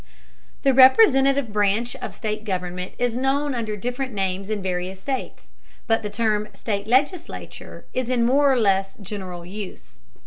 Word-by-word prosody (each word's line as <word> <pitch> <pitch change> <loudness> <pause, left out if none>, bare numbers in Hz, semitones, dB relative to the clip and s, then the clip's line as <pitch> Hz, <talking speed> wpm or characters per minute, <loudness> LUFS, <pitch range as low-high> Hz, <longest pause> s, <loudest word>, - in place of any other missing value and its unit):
The 270 - +4
representative 270 - +5
branch 210 +3 +1
of - - -7
state 215 -1 -3
government 180 -2 -4
is 245 -1 0
known 275 +3 0
under 220 -3 -3
different 250 +4 -3
names 195 0 -2
in 215 -1 -1
various 185 0 -3
states, 265 +5 -5 0.4
but 225 -1 +2
the 210 - -4
term 210 0 0
"state 205 -2 -3
legislature" 290 +8 -2
is 255 -1 -2
in 245 -2 +2
more 280 +3 +4
or 260 - +2
less 195 -2 +1
general 185 -3 -7
use. 195 - -9
220 Hz, 150 wpm, -23 LUFS, 195-260 Hz, 0.4 s, representative